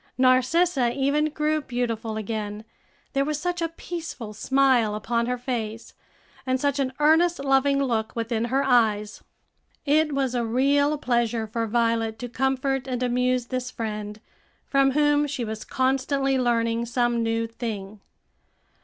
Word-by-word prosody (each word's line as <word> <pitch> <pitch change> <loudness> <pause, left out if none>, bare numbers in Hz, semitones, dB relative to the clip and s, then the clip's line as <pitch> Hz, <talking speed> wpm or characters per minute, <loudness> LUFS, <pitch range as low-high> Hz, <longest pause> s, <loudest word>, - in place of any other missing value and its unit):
Narcissa 255 +2 +3
even 280 +3 +2
grew 310 0 0
beautiful 230 -4 -3
again, 215 0 -4 0.5
there 275 -1 +2
was 300 +1 -2
such 350 +1 -2
a 330 - +1
peaceful 325 -10 -7
smile 255 -2 +2
upon 235 +2 -1
her 250 0 -1
face, 230 -3 -4 0.5
and 260 0 0
such 285 +1 0
an 265 -2 0
earnest, 325 +3 +4
loving 275 0 +2
look 225 -4 -1
within 230 0 -1
her 265 +3 +1
eyes. 220 -5 +2 0.6
It 305 +1 +3
was 270 -2 0
a 240 -1 0
real 280 +5 +2
pleasure 235 -4 0
for 225 +1 -3
Violet 230 -1 0
to 245 +2 -6
comfort 265 +1 -1
and 250 -1 -2
amuse 250 0 +1
this 255 0 -3
friend, 210 -2 -5 0.5
from 275 -1 +2
whom 295 0 +3
she 270 -4 -3
was 215 0 -5
constantly 270 +1 0
learning 235 -2 +1
some 240 -1 +1
new 225 0 0
thing. 215 -3 -6
250 Hz, 145 wpm, -25 LUFS, 230-275 Hz, 0.6 s, earnest